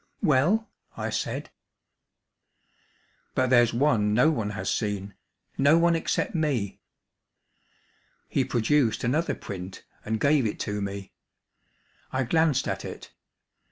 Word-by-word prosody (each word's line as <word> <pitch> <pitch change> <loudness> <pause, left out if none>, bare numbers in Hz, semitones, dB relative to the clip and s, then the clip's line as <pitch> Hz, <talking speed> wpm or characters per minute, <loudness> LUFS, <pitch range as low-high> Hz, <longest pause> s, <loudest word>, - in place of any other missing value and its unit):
"Well?" 175 - +3 0.3
I - - -3
said. - - -3 1.8
"But 130 -2 +1
there's 120 -2 +5
one 115 -5 +2
no 150 +7 +5
one 115 -9 -2
has - - -4
seen 100 -2 -2 0.5
no 145 +4 +5
one 170 0 +4
except 165 - -1
me." 140 - -1 1.5
He - - +1
produced 115 -1 +1
another 150 +8 +1
print 95 -1 -8 0.2
and 110 0 -2
gave 140 -2 +3
it 105 - -5
to 105 0 -2
me. 100 0 -5 1.0
I 130 0 0
glanced 155 0 +2
at - - -3
it. - - -8
125 Hz, 120 wpm, -26 LUFS, 105-150 Hz, 1.8 s, there's